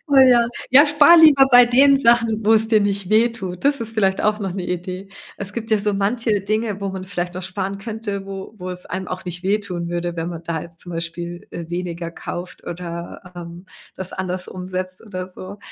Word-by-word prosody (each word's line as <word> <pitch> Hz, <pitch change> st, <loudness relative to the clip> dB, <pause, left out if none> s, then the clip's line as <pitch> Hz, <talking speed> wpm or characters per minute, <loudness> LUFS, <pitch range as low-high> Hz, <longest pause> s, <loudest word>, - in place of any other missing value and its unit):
Oh 280 Hz, -, +3 dB
ja. 245 Hz, -3 st, +6 dB, 0.2 s
Ja, 285 Hz, +4 st, +8 dB
spar 300 Hz, +3 st, +6 dB
lieber 285 Hz, -4 st, +7 dB
bei 245 Hz, -1 st, +8 dB
den 275 Hz, +3 st, +5 dB
Sachen, 230 Hz, -3 st, +2 dB
wo's 220 Hz, 0 st, +4 dB
dir 215 Hz, -2 st, +4 dB
nicht 200 Hz, -1 st, -1 dB
wehtut. 220 Hz, -4 st, +1 dB
Das 285 Hz, -3 st, +2 dB
ist 225 Hz, 0 st, -5 dB
vielleicht 195 Hz, -3 st, +1 dB
auch 210 Hz, 0 st, +2 dB
noch 195 Hz, -3 st, -3 dB
'ne 185 Hz, -2 st, -4 dB
Idee. 185 Hz, +2 st, -5 dB, 0.3 s
Es 200 Hz, 0 st, -6 dB
gibt 225 Hz, -1 st, -6 dB
ja 215 Hz, -, +4 dB
so 205 Hz, 0 st, 0 dB
manche 210 Hz, +1 st, 0 dB
Dinge, 215 Hz, 0 st, -2 dB
wo 200 Hz, -, -2 dB
man 190 Hz, -1 st, -5 dB
vielleicht 180 Hz, -2 st, -4 dB
noch 185 Hz, -, -5 dB
sparen 195 Hz, +1 st, -4 dB
könnte, 210 Hz, -2 st, -5 dB
wo 195 Hz, +2 st, -8 dB
wo 185 Hz, 0 st, -5 dB
es 180 Hz, 0 st, -7 dB
einem 185 Hz, 0 st, -5 dB
auch 185 Hz, +1 st, -5 dB
nicht 180 Hz, 0 st, -6 dB
wehtun 190 Hz, -4 st, -1 dB
würde, 175 Hz, 0 st, -3 dB
wenn 165 Hz, +1 st, -3 dB
man 170 Hz, -1 st, -7 dB
da 160 Hz, -1 st, -3 dB
jetzt 170 Hz, -1 st, -12 dB
zum 175 Hz, -, -9 dB
Beispiel, 170 Hz, +1 st, -6 dB
äh, 170 Hz, -1 st, -7 dB
weniger 170 Hz, -1 st, -4 dB
kauft 175 Hz, +1 st, -7 dB
oder, 175 Hz, +1 st, -7 dB
ähm, 175 Hz, +1 st, -9 dB, 0.3 s
das 190 Hz, -1 st, -6 dB
anders 185 Hz, -1 st, -4 dB
umsetzt 185 Hz, +1 st, -5 dB
oder 185 Hz, -2 st, -5 dB
so. 185 Hz, +2 st, -10 dB
195 Hz, 210 wpm, -21 LUFS, 180-220 Hz, 0.3 s, Ja